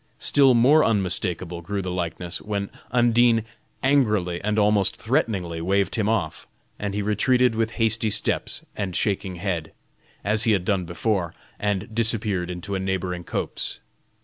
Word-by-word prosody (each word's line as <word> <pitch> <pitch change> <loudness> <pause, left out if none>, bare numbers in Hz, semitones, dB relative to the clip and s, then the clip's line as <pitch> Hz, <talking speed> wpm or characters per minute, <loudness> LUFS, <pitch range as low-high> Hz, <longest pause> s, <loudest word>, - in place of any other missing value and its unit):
Still 135 -3 +4
more 140 +7 +6
unmistakable 90 -4 -1
grew 100 +3 -3
the 90 - -3
likeness, 85 -1 -4
when 100 -1 -3 0.2
Undine 120 -1 +3 0.4
angrily 105 -11 +2
and 105 +1 0
almost 105 -2 +3
threateningly 100 - -1
waved 95 +2 +1
him 110 -2 0
off, 95 -9 -2 0.3
and 100 -1 -3
he 105 - -1
retreated 125 +4 +2
with 115 0 -1
hasty 110 -1 +1
steps - - -1
and 95 -4 -3
shaking 95 -3 -1
head, 85 -3 -3 0.5
as 110 +3 +2
he 110 - +4
had 95 -3 0
done 95 -3 0
before, 90 0 -1 0.2
and 105 +2 -2
disappeared 105 -5 0
into 90 +3 -5
a 95 - -1
neighboring 95 -2 -2
copse. - - -3
100 Hz, 150 wpm, -24 LUFS, 90-115 Hz, 0.5 s, more